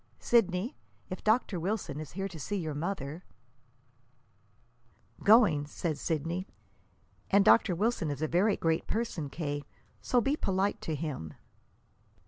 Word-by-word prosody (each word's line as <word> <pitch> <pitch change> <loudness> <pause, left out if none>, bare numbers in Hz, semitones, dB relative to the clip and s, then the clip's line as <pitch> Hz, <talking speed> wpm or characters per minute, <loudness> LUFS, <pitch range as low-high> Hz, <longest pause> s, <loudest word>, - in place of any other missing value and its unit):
Sidney, 215 - +2 0.4
if 185 - -5
Dr. 215 -4 +2
Wilson 185 -4 -2
is 155 -3 -8
here 195 +2 -2
to 175 -4 -10
see 205 +8 -3
your 160 -6 -2
mother 160 0 -4 1.0
" 115 0 -27
"Going," 200 -10 +5
said 155 +1 -2
Sidney. 165 +5 -2 0.8
"And 200 0 +5
Dr. 215 -5 +5
Wilson 205 -4 0
is 145 +1 -3
a - - +2
very 195 +6 +2
great 165 -1 0
person, 210 -10 -2
K., 145 -2 -3 0.4
so 250 - +2
be 270 +5 +1
polite 195 -6 0
to 160 - -2
him." 140 - -5
170 Hz, 135 wpm, -30 LUFS, 145-200 Hz, 1.0 s, Going